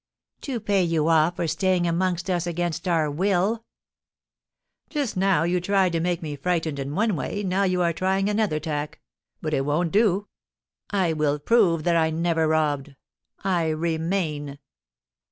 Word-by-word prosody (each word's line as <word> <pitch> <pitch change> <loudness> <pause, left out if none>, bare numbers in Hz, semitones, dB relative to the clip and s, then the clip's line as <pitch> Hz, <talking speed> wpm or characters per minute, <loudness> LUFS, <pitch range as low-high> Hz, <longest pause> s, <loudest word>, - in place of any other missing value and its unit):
"To 260 -4 -3
pay 200 -2 +1
you 165 -2 +1
off 165 +1 +3
for 170 - -2
staying 185 +1 +1
amongst 175 +1 0
us 175 -2 -1
against 175 +1 -2
our 160 -4 +1
will." 195 +7 +1 1.3
"Just 285 -7 -2
now 190 -4 +2
you 175 +1 +1
tried 190 0 +2
to 165 - 0
make 175 0 -1
me 150 -2 -4
frightened 160 -1 -1
in 140 +2 -4
one 215 -1 +1
way, 205 +7 -3
now 190 +1 +1
you 180 -1 +1
are 170 -1 +1
trying 190 +3 0
another 210 -7 0
tack. 150 -1 -4 0.4
But - - -2
it 135 - +1
won't 155 +4 0
do. 205 -1 +2 0.6
I 185 -5 +1
will 150 -2 +1
prove 170 -1 +3
that 170 0 +2
I 160 -1 +3
never 165 0 +1
robbed. 150 -3 0 0.5
I 175 -4 +1
remain." 160 -2 -2
175 Hz, 160 wpm, -24 LUFS, 155-190 Hz, 1.3 s, off